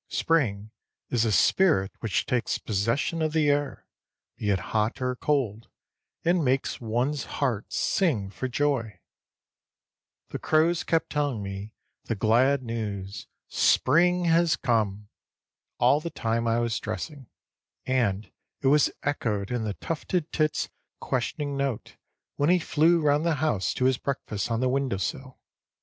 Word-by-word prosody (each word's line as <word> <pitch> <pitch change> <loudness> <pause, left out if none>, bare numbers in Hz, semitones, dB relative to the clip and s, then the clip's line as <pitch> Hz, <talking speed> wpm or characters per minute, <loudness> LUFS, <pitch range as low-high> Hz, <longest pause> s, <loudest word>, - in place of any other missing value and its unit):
Spring 110 -10 0 0.4
is 120 -2 +2
a 110 - +1
spirit 105 - +3
which 110 -4 -1
takes 125 -2 0
possession 115 - -1
of 155 -1 0
the 155 -2 +3
air, 145 -1 -2 0.5
be 105 - -3
it 100 - +3 0.2
hot 110 0 +1
or 125 0 -1
cold, 125 -6 -1 0.6
and 175 0 +3
makes 130 -1 0
one's 125 +6 -1
heart 125 -7 -1
sing 130 - 0
for 130 - -4
joy. 130 -4 -1 1.3
The - - -5
crows 160 +2 +2
kept 165 -1 0
telling 145 -8 -1
me 100 +2 -7 0.3
the 115 - -2
glad 125 +6 +3
news, 105 -4 -5 0.2
"Spring 175 +6 +3
has 165 0 +3
come!" 105 -5 0 0.7
all 125 +4 +4
the 170 +2 -5
time 115 -4 -1
I 115 0 +2
was 115 -1 -1
dressing, 130 - -6 0.6
and 115 -6 0 0.3
it 135 - +3
was 150 +1 +4
echoed 110 -8 -1
in 120 -3 -1
the 105 -2 -3
tufted 165 0 -3
tit's 155 -1 0 0.3
questioning 145 -1 -2
note 135 -4 -3 0.4
when 145 +2 +2
he 180 - +5
flew 165 0 +3
round 150 0 +2
the 170 -2 +1
house 135 -10 0
to 125 - 0
his 130 -1 +2
breakfast 120 -6 -3
on 115 0 0
the 130 - +2
window 130 -5 0
sill. 130 - -4
130 Hz, 145 wpm, -26 LUFS, 110-150 Hz, 1.3 s, he